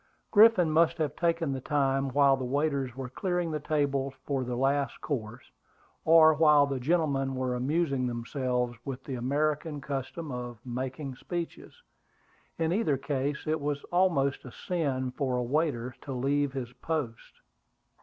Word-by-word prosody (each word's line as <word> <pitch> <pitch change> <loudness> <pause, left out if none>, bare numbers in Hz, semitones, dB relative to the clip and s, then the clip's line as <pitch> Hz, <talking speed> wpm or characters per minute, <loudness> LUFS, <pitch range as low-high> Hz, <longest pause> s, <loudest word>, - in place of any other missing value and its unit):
Griffin 205 -6 +6
must 160 +1 +3
have 155 -3 -1
taken 165 -4 0
the 135 - -4
time 135 -1 +1
while 140 +1 +4
the 130 - -5
waiters 140 -1 -1
were 135 -1 -5
clearing 175 +5 -2
the 155 - -2
tables 140 -3 -1
for 135 -2 -1
the 125 0 -3
last 135 +2 0
course, 110 -8 -5 0.5
or 160 -1 +7
while 150 -2 +5
the 135 -2 -3
gentlemen 135 -2 +1
were 130 -1 -1
amusing 135 0 0
themselves 125 0 -2
with 135 -2 -6
the 135 - -6
American 145 +4 -1
custom 140 +3 -5
of 120 -1 -5
making 130 +2 -4
speeches. 175 - -6 0.7
In 165 0 +1
either 180 -9 +1
case, 140 +1 -2
it 155 0 -1
was 145 0 -2
almost 170 -7 +2
a 125 - -9
sin 135 -8 -2
for 130 -1 -1
a 125 - 0
waiter 130 -2 -1
to 135 - -6
leave 140 +2 0
his 125 -3 -5
post. 130 -3 -5
140 Hz, 155 wpm, -29 LUFS, 130-155 Hz, 0.7 s, or